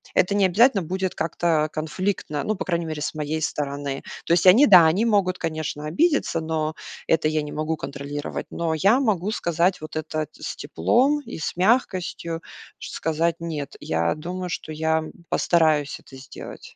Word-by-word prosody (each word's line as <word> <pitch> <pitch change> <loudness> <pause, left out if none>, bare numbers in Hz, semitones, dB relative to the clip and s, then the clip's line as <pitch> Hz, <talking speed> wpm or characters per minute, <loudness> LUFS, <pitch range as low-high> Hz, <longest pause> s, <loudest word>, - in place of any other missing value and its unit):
это 195 +2 +3
не 200 -1 +4
обязательно 205 +2 +4
будет 185 +2 -2
как-то 160 -1 +1
конфликтно, 155 -1 -2
ну, 215 - -1
по - - -4
крайней 170 -2 -1
мере, 155 -2 -5
с - - -2
моей 155 +1 -2
стороны. 140 -2 -3 0.2
То - - +2
есть 175 - +3
они, 230 +11 +8
да, 180 -5 +9
они 170 +7 +3
могут, 200 -5 +2
конечно, 155 -2 -3
обидеться, 295 - +1
но 160 -1 -2 0.3
это 160 -1 +2
я 155 0 0
не 150 0 -6
могу 155 +2 -2
контролировать. 145 +1 -5
Но 165 -1 -1
я 200 - +4
могу 210 -6 0
сказать 175 -2 0
вот 155 0 -8
это 155 0 -3
с - - -6
теплом 260 - +2
и 235 -9 -8
с - - -3
мягкостью, 185 -5 0 0.4
сказать: 165 +1 -1
"Нет". 155 -4 -5
Я 80 +1 0
думаю, 180 +3 -5
что 155 - -5
я 160 +1 0 0.3
постараюсь 155 -4 +2
это 135 - -15
сделать. 130 - -11
165 Hz, 170 wpm, -24 LUFS, 155-185 Hz, 0.4 s, да